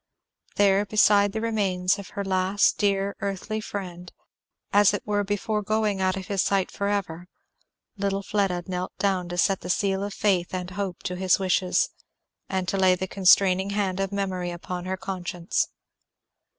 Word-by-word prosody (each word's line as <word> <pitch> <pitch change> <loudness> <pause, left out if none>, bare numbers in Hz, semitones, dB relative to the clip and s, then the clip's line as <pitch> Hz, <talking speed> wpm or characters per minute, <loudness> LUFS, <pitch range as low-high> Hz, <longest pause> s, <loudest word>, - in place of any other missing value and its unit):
There 200 0 +4
beside 205 -1 +4
the 220 +2 -3
remains 195 -5 0
of 200 - -9
her 200 - -1
last 190 +1 +2
dear 200 -1 +1
earthly 200 +2 -3
friend, 180 -4 -7 0.6
as 205 0 +5
it - - -6
were 205 -1 0
before 205 +1 -1
going 210 -1 0
out 185 0 +1
of 190 - -5
his 195 0 0
sight 195 -2 +1
forever, 195 -4 -2 0.7
little 200 0 -1
Fleda 195 -4 0
knelt 180 -1 -4
down 185 -3 0
to 175 - -5
set 195 +2 +2
the 180 - -7
seal 195 +1 +1
of 200 0 -4
faith 185 -3 +1
and 180 0 -4
hope 195 -2 -4
to 180 - -3
his 185 -1 +3
wishes, 185 -1 +1 0.6
and 190 -1 -2
to 195 - -1
lay 185 -1 +4
the 185 - -3
constraining 190 0 +4
hand 200 -2 -1
of 195 0 -1
Memory 190 -3 -2
upon 175 +1 -6
her 190 0 -2
conscience. 180 -2 -2
195 Hz, 165 wpm, -25 LUFS, 185-200 Hz, 0.7 s, as